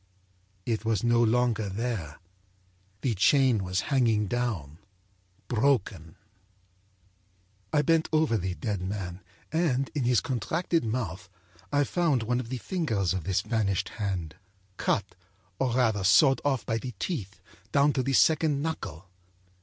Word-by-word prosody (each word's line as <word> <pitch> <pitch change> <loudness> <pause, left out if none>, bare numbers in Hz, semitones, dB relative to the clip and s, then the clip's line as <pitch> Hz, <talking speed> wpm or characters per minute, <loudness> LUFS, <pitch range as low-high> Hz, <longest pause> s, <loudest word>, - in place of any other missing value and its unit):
It 115 -2 -1
was 110 -3 0
no 120 0 +3
longer 115 -2 +2
there. 95 -7 -4 0.8
The 125 - 0
chain 120 +1 +3
was 90 +1 -1
hanging 115 -5 +3
down, 95 - -3 0.7
broken. 110 - 0 1.6
âI 150 -1 +2
bent 165 +1 +2
over 155 -6 +2
the 95 -3 -2
dead 105 -4 -3
man 95 -1 -5 0.3
and, 145 -5 0
in 140 -5 -1
his 120 -2 +4
contracted 155 - -1
mouth, 105 -6 -3 0.4
I 145 0 +3
found 150 -5 +1
one 120 +2 0
of 120 -2 -6
the 130 - -3
fingers 115 - -1
of 95 -4 -4
this 95 0 +1
vanished 105 -3 -1
hand, 90 -6 -3 0.4
cutâor 100 - +1 0.7
rather 110 -6 +2
sawed 120 +9 +5
off 135 -4 0
by 115 0 -1
the 125 -1 -7
teeth 105 - -4 0.3
down 140 +1 +4
to 130 - 0
the 135 +2 -1
second 155 +1 +3
knuckle. 95 - -5
115 Hz, 135 wpm, -28 LUFS, 100-135 Hz, 1.6 s, sawed